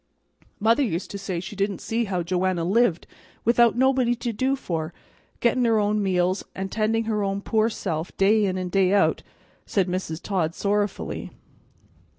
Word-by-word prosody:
"Mother 225 +5 +3
used 190 -9 -2
to 200 - -5
say 185 -3 -3
she 185 +4 -7
didn't 200 0 -1
see 230 +1 -1
how 185 -4 -2
Joanna 180 0 0
lived 195 -2 +2 0.4
without 235 0 +5
having - - -4
nobody 260 -2 +3
to 235 0 -3
do 260 +5 +1
for, 165 -9 -4 0.5
getting 240 +1 +2
her 225 -1 +3
own 210 0 +1
meals 185 -1 +1
and 190 0 -4
tending 225 +1 +1
her 215 -2 -1
own 195 0 -1
poor 220 +1 +1
self 170 -6 -4
day 205 +2 +4
in 185 -1 -1
an' 185 -1 -3
day 190 0 +2
out," 200 - +3 0.5
said 195 -3 +1
Mrs. 180 -3 -3
Todd 175 -3 -1
sorrowfully. 205 0 -2
200 Hz, 170 wpm, -24 LUFS, 185-225 Hz, 0.5 s, without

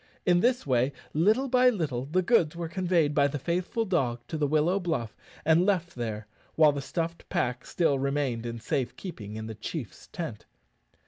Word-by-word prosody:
In 175 -1 +4
this 245 +5 +2
way, 130 0 +2 0.2
little 215 - +3
by 250 0 +5
little, 150 - -2
the 185 +5 +1
goods 170 -6 +3
were 170 -1 -3
conveyed 170 -4 +1
by 145 -1 +4
the 145 - -3
faithful 180 - -1
dog 135 - 0
to 160 - -3
the 145 - +2
willow 155 +6 +2
bluff 160 - -2 0.3
and 160 +2 +5
left 180 -3 +1
there, 110 -3 -4 0.3
while 155 -2 +6
the 140 -1 -4
stuffed 165 +4 -4
pack 125 0 -1
still 145 -6 +1
remained 135 -4 -1
in 115 0 -5
safe 125 +1 -2
keeping 110 - -7
in 110 0 -5
the 110 - -5
chiefs 110 - -7
tent. 160 -11 -6
155 Hz, 185 wpm, -28 LUFS, 125-175 Hz, 0.3 s, while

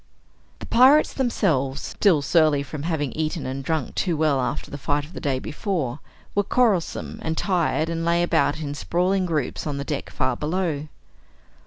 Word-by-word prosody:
The - - -9
pirates 265 +5 +5
themselves, 155 - 0
still 160 +1 +2
surly 155 -3 +3
from 145 +1 -7
having 150 -4 -1
eaten 155 +1 -2
and 135 +1 -4
drunk 155 -2 -2
too 175 -5 0
well 150 -4 +2
after 125 - -3
the 145 - -6
fight 145 +2 0
of 160 - -15
the - - -6
day 140 -5 0
before, 150 - -3 0.3
were 205 - +3
quarrelsome 205 -4 0
and 160 0 -2
tired 170 -4 +1
and 165 0 -2
lay 170 +1 +2
about 160 -3 +2
in 145 -2 -3
sprawling 180 +5 0
groups 155 -3 -2
on 145 -2 -2
the 140 - -3
deck 145 -1 -4
far 130 -1 -1
below. 155 0 -2
155 Hz, 175 wpm, -24 LUFS, 145-175 Hz, 0.3 s, pirates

